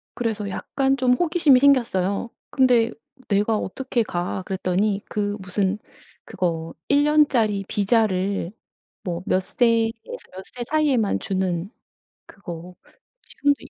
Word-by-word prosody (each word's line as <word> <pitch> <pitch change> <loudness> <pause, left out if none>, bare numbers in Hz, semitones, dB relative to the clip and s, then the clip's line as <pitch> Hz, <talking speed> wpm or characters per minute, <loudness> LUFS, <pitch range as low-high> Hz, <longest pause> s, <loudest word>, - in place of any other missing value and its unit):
그래서 220 -4 -2
약간 270 +7 0
좀 255 -2 +3
호기심이 310 -3 +4
생겼어요. 235 -7 +2 0.2
"근데 245 -4 +3 0.4
내가 210 +2 +2
어떻게 240 +3 -2
가?" 180 -1 -3
그랬더니 195 +2 0
그 205 0 -2
무슨 190 +1 -1 0.5
그거 165 -2 -3
1 285 +1 +4
년짜리 250 -10 +3
비자를 200 -3 +1 0.5
뭐 175 -1 -3
몇 185 0 +1
세에서 230 0 +2 0.4
몇 190 +1 -8
세 245 - -4
사이에만 280 -9 +2
주는 185 -1 -2 0.6
그거 180 -2 -9 0.5
지금도 285 0 0
210 Hz, 240 characters per minute, -23 LUFS, 190-250 Hz, 0.6 s, 호기심이